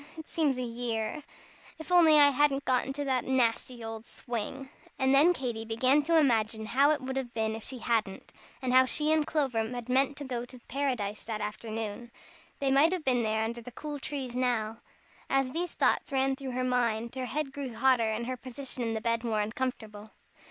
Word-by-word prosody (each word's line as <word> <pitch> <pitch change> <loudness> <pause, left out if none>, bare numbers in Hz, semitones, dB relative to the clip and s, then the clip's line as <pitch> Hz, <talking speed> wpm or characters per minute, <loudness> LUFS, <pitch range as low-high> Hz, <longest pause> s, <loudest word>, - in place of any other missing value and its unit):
It 320 - -8
seems 295 -5 +1
a 255 - -2
year. 230 +1 -3 0.6
If 320 +3 -9
only 330 -4 +7
I 285 -1 +7
hadn't 280 0 +2
got 255 0 +1
into 280 +2 -3
that 260 -3 0
nasty 245 -1 0
old 225 0 -6
swing!" 245 +3 -5 0.3
And 265 0 +2
then 295 +6 +6
Katy 245 -9 -3
began 255 +6 +3
to 330 +3 +2
imagine 220 -6 +2
how 275 +6 +3
it 305 -2 +1
would 265 +1 -4
have 245 -3 -4
been 220 -1 0
if 220 - -8
she 260 - -6
hadn't, 225 -5 -2 0.3
and 250 -1 0
how 260 0 +7
she 300 +4 +1
and 310 -1 +2
Clover 275 -7 0
had 245 0 -6
meant 270 +2 +2
to 290 - -6
go 250 -3 -3
to 255 +1 -11
Paradise 240 -7 -2
that 220 -2 -5
afternoon. 215 +2 -5 0.5
They 275 -1 0
might 295 +6 +5
have 360 -4 -3
been 250 -2 +2
there 220 0 0
under 235 +2 -4
the 235 - -9
cool 295 +3 -6
trees 265 -3 -4
now. 230 -3 0 0.5
As 270 -1 +1
these 345 +4 -3
thoughts - - +1
ran 270 0 +1
through 265 -2 -6
her 255 +1 -1
mind, 235 -2 0
her 260 -1 -3
head 300 0 -2
grew 270 -5 -5
hotter 250 -4 +3
and 220 +2 -2
her 255 +1 -3
position 255 +1 -6
in 225 -1 -1
the 220 - -3
bed 230 +1 0
more 225 -3 0
uncomfortable. 220 -2 -4
255 Hz, 205 wpm, -29 LUFS, 225-275 Hz, 0.6 s, only